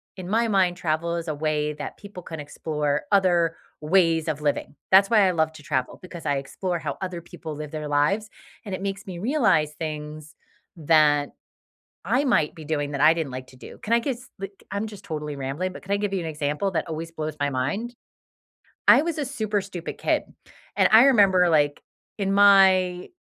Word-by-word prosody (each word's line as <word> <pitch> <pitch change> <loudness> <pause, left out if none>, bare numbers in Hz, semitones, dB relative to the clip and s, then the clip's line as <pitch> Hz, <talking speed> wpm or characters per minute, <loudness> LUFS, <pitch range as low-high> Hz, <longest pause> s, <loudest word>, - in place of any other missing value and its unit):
in 185 -2 -8
my 225 +4 +1
mind, 185 -4 +2
travel 170 0 -1
is 170 0 -4
a 155 - -2
way 150 0 -1
that 150 0 -7
people 200 -3 -11
can 160 -2 -7
explore 150 0 -2
other 175 -4 +3 0.3
ways 165 0 +2
of 150 -2 -2
living. 145 0 -2
That's 195 +2 +6
why 210 -4 +5
I - - +2
love 160 -2 +1
to 160 - -12
travel, 130 -2 -2
because 180 -2 -10
I 145 - +1
explore 175 +6 -3
how 145 -3 -4
other 180 -2 -5
people 160 -2 -9
live 150 0 -6
their 155 0 -5
lives, 150 +10 +1 0.3
and 200 - -6
it 185 - -4
makes 195 0 -4
me 180 -3 -7
realize 195 - +2
things 155 0 -6 0.4
that 150 -2 +3 0.8
I 270 +3 +2
might 190 - +2
be 160 -3 -11
doing 145 -1 -2
that 140 0 -1
I 155 +1 +7
didn't 165 -4 -3
like 130 0 -7
to 130 - -16
do. - - -12
Can 220 - -3
I 235 - +6
give 255 +1 -2
s 250 +2 -16
like, 195 0 -8
I'm 200 +2 -2
just 210 -2 -11
totally 150 -5 -5
rambling, 140 +8 -3
but - - -10
can 195 - -5
I 200 - +2
give 205 -1 -2
you 190 - 0
an - - -5
example 150 +4 -2
that 175 - -2
always 165 +1 -5
blows 155 -2 -5
my 145 0 0
mind? 200 - -2 0.9
I - - +8
was 330 +1 -2
a 300 - -2
super 215 -6 -2
stupid 185 -3 -7
kid, - - 0 0.5
and - - +5
I 225 +3 +9
remember, 200 -9 +5
like, 145 -3 +2 0.4
in 195 -1 0
my 190 -3 +5
170 Hz, 205 wpm, -24 LUFS, 150-195 Hz, 0.9 s, I